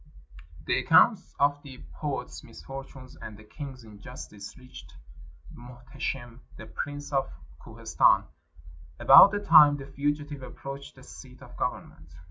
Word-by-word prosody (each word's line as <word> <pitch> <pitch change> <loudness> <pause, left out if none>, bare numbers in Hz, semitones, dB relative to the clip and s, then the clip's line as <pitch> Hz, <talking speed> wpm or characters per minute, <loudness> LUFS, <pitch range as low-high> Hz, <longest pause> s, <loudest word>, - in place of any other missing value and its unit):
The - - +1
accounts - - +3
of 145 +1 +1
the 135 -3 -13
poet's 145 -3 -6
misfortunes 135 -1 -11
and 105 -2 -10
the 110 - -15
king's 130 +2 -10
injustice 105 -1 -11
reached 125 0 -14 0.6
Muhteshim, 120 0 -8 0.2
the 110 - -10
Prince 145 +5 -7
of 135 -1 0 0.3
Kohistan, - - +2 0.8
about 140 +8 +9
the 205 0 -4
time 150 -3 +7
the 135 - -9
fugitive 145 +1 -4
approached 135 +2 -9
the - - -16
seat - - -14
of - - -15
government. 75 0 -6
135 Hz, 125 wpm, -27 LUFS, 120-145 Hz, 0.8 s, about